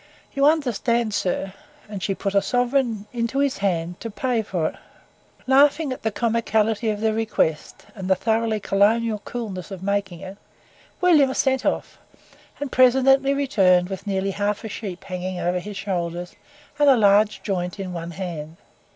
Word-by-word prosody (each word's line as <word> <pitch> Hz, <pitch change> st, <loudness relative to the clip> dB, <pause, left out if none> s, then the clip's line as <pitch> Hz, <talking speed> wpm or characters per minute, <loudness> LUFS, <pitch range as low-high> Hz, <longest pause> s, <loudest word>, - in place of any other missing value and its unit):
You 275 Hz, 0 st, +3 dB
understand, 240 Hz, -7 st, +1 dB
Sir," 190 Hz, 0 st, -2 dB, 0.3 s
and 205 Hz, -2 st, -7 dB
she 190 Hz, +3 st, -1 dB
put 195 Hz, 0 st, -3 dB
sovereign 245 Hz, -1 st, 0 dB
into 235 Hz, +2 st, -2 dB
his 280 Hz, -3 st, +1 dB
hand 175 Hz, -3 st, -1 dB
to 230 Hz, -, -5 dB
pay 240 Hz, +2 st, -1 dB
for 180 Hz, -6 st, -2 dB
it. -, -, -14 dB, 0.7 s
Laughing 280 Hz, +2 st, +4 dB
at -, -, -10 dB
the 220 Hz, -, 0 dB
comicality 225 Hz, -1 st, 0 dB
of 210 Hz, -1 st, -2 dB
the 220 Hz, -1 st, +1 dB
request, 215 Hz, -8 st, -1 dB
and 190 Hz, -3 st, -6 dB
the 190 Hz, -, +5 dB
thoroughly 220 Hz, +2 st, 0 dB
colonial 215 Hz, +3 st, +2 dB
coolness 210 Hz, -7 st, -6 dB
of 190 Hz, -2 st, -8 dB
making 200 Hz, -3 st, -2 dB
it, 190 Hz, +1 st, -9 dB, 0.6 s
William 310 Hz, -7 st, +5 dB
set 265 Hz, -1 st, +1 dB
off, -, -, -2 dB, 0.6 s
and 285 Hz, -2 st, -4 dB
presently 265 Hz, +2 st, +4 dB
returned 190 Hz, -10 st, +3 dB
with 195 Hz, +1 st, -7 dB
nearly 195 Hz, 0 st, -1 dB
half 205 Hz, +1 st, -2 dB
a 220 Hz, -, -5 dB
sheep 190 Hz, -4 st, -6 dB
hanging 185 Hz, 0 st, -5 dB
over 180 Hz, +1 st, 0 dB
his 205 Hz, +2 st, -8 dB
shoulders, 175 Hz, -3 st, -4 dB, 0.4 s
and 290 Hz, -1 st, +5 dB
a 265 Hz, -, +6 dB
large 210 Hz, 0 st, +3 dB
joint 180 Hz, -1 st, -3 dB
in 185 Hz, -2 st, -5 dB
one 170 Hz, -1 st, -5 dB
hand. 170 Hz, -3 st, -6 dB
210 Hz, 160 wpm, -23 LUFS, 190-245 Hz, 0.7 s, a